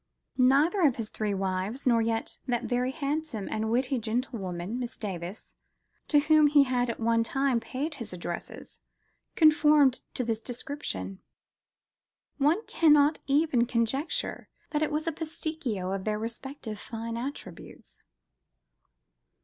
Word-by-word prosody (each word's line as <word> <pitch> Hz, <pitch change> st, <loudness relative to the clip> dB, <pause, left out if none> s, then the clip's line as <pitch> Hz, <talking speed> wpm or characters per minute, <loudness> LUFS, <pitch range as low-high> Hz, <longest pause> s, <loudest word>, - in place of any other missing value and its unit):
Neither 285 Hz, +10 st, +4 dB
of 285 Hz, -7 st, +4 dB
his 225 Hz, -3 st, -4 dB
three 210 Hz, -2 st, -2 dB
wives, 190 Hz, +6 st, -2 dB
nor 235 Hz, -3 st, +4 dB
yet 225 Hz, 0 st, -2 dB
that 240 Hz, -2 st, 0 dB
"very 250 Hz, +1 st, 0 dB
handsome 285 Hz, -5 st, -3 dB
and 220 Hz, 0 st, -1 dB
witty 255 Hz, +2 st, +1 dB
gentlewoman," 220 Hz, -3 st, -3 dB
Miss 245 Hz, -2 st, -5 dB
Davis, 185 Hz, -1 st, -6 dB, 0.5 s
to 295 Hz, -, +4 dB
whom 310 Hz, 0 st, +5 dB
he 290 Hz, -1 st, +6 dB
had 250 Hz, -2 st, 0 dB
at 235 Hz, -, -4 dB
one 230 Hz, 0 st, +2 dB
time 270 Hz, 0 st, +1 dB
paid 270 Hz, +7 st, -4 dB
his 235 Hz, -7 st, -7 dB
addresses, 175 Hz, -1 st, -7 dB, 0.6 s
conformed 300 Hz, -4 st, +5 dB
to 250 Hz, -, -1 dB
this 225 Hz, -2 st, -1 dB
description: 225 Hz, -, -5 dB, 1.2 s
one 315 Hz, +10 st, +2 dB
cannot 300 Hz, -2 st, +4 dB
even 275 Hz, -4 st, +3 dB
conjecture 250 Hz, +6 st, -1 dB, 0.2 s
that 300 Hz, -, 0 dB
it 310 Hz, -, +1 dB
was 305 Hz, +1 st, -1 dB
a 330 Hz, -, +1 dB
pasticcio 310 Hz, -, -3 dB
of 190 Hz, -, -5 dB
their 215 Hz, 0 st, -1 dB
respective 230 Hz, 0 st, -6 dB
fine 230 Hz, +1 st, -5 dB
attributes. 240 Hz, -7 st, -8 dB
245 Hz, 135 wpm, -28 LUFS, 220-290 Hz, 1.2 s, he